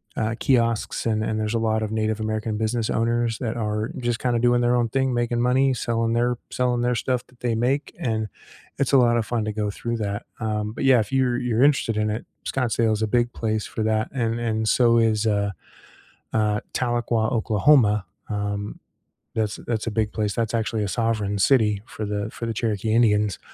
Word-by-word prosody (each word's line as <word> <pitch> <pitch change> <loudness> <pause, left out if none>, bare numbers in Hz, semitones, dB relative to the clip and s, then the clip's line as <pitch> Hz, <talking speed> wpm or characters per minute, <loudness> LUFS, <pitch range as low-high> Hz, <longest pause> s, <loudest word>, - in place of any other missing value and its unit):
uh, 110 +1 -1
kiosks 115 -5 +1
and 110 -1 +1
and 110 0 -1
there's 110 +1 -1
a - - +2
lot 110 -1 +1
of 110 - -3
Native 110 0 -1
American 110 0 -2
business 110 +1 -1
owners 115 0 0
that 115 -2 -3
are 105 0 -2
just 120 -2 -1
kinda 120 -2 +1
doing 120 0 +3
their 120 0 +3
own 120 -1 +2
thing, 135 +1 0
making 120 0 0
money, 130 +2 +3
selling 115 -1 -1
their 120 +1 +1
selling 125 -1 0
their 125 0 +1
stuff 125 +1 -1
that 125 - -25
they 120 -2 0
make, 135 +5 0
and 110 -3 -1 0.5
it's 140 0 0
a - - +8
lot 120 -2 +4
of 115 - 0
fun 115 -1 -1
to 110 - -2
go 105 0 -2
through 115 +3 -3
that, 105 0 -3
um, 105 -1 -2
but 125 - -3
yeah, 130 -2 +6
if 105 - -6
you're 130 -2 +2
you're 125 -1 +1
interested 135 -6 +3
in 105 0 +1
it, 110 +2 -3 0.2
Scottsdale 115 -3 +1
is 110 - -2
a 110 - +1
big 120 +2 +1
place 110 -1 -2
for 110 - -4
that 110 0 0
and 115 -3 -1
and 110 -2 0
so 115 -2 +4
is, 110 -1 +2
uh, 100 -1 +1 0.8
uh, 105 -1 +2
Tahlequah, 120 -2 0
Oklahoma, 110 -2 +3 0.2
um, 105 0 -3 0.6
that's 110 -1 -1
that's 115 -2 -2
a - - -1
big 110 -1 -1
place, 105 -2 -1
that's 115 -1 -1
actually 110 -1 0
a - - -2
sovereign 110 -2 -1
city 105 -1 +3
for 110 - -6
the 105 0 -2
for 115 - -7
the 115 - -1
Cherokee 110 -1 -1
Indians, 105 -4 +3
115 Hz, 205 wpm, -24 LUFS, 110-120 Hz, 0.8 s, a